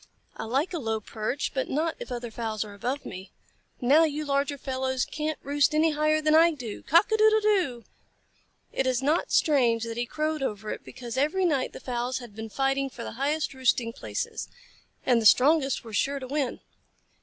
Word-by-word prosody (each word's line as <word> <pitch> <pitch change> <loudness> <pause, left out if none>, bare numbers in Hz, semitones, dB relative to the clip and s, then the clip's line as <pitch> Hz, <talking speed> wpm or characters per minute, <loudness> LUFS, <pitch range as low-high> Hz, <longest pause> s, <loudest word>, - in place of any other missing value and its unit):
I - - -5
like 275 +11 0
a 340 - -2
low 225 -4 -1
perch, 220 +6 -3
but 265 - -2
not 315 +3 0
if - - -8
other 240 -1 -4
fowls 220 -1 -3
are 205 - -10
above 250 +8 -3
me. 185 +2 -8 0.5
Now 285 +6 +5
you 305 -1 -1
larger 280 0 0
fellows 260 -1 -1
can't 305 0 -3
roost 290 +2 +2
any 315 +1 +4
higher 305 +1 +2
than 305 0 +3
I 330 +1 +6
do. 240 -8 -7
Cock 335 +9 +4
a 440 - +3
doodle 435 0 +5
doo!" 370 - +1 0.9
It 265 - 0
is 255 0 0
not 305 +5 +1
strange 240 -7 +3
that 230 0 -5
he 240 0 -1
crowed 310 +2 -2
over 210 -4 -3
it, - - -6
because 240 0 -8
every 310 +8 +2
night 280 -7 +1
the - - -8
fowls 245 0 -2
had 240 -5 -10
been 220 0 -6
fighting 270 +3 0
for 245 -2 -8
the - - -5
highest 290 +6 -1
roosting 250 -3 +1
places, - - -4 0.6
and 245 -3 +4
the 220 - +6
strongest 275 +3 +4
were 225 -2 -10
sure 275 +8 +1
to 265 - -6
win. 275 -2 -2
270 Hz, 200 wpm, -27 LUFS, 240-305 Hz, 0.9 s, I